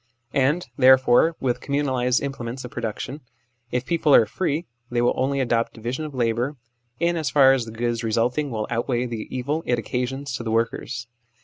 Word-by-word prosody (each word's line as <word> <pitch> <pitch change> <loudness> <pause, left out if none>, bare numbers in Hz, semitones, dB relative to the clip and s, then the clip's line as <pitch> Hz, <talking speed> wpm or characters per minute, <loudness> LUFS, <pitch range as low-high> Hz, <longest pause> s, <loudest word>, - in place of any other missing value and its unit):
And, 145 +6 +2
therefore, 130 +4 +6
with 125 -2 0
communalised 130 -3 0
implements 130 -2 -5
of 125 - -8
production, 120 +5 -4 0.5
if 125 +1 -2
people 160 -4 +3
are 115 - +7
free, 155 - -2 0.2
they 120 - -1
will 120 0 +3
only 135 +2 0
adopt 120 -3 0
division 120 +7 -4
of 150 -3 -8
labour 120 +3 0 0.4
in 170 +1 +2
as 155 -3 -1
far 135 -2 +6
as 130 -3 0
the 110 - -8
good 115 +1 -2
re 110 - -1
sulting 125 +6 +1
will 110 -3 -2
outweigh 120 +1 0
the 115 -3 -5
evil 140 +5 -2
it 120 - +2
occasions 125 +4 -3
to - - -6
the 115 - -3
workers. 115 +1 -1
125 Hz, 185 wpm, -24 LUFS, 120-140 Hz, 0.5 s, are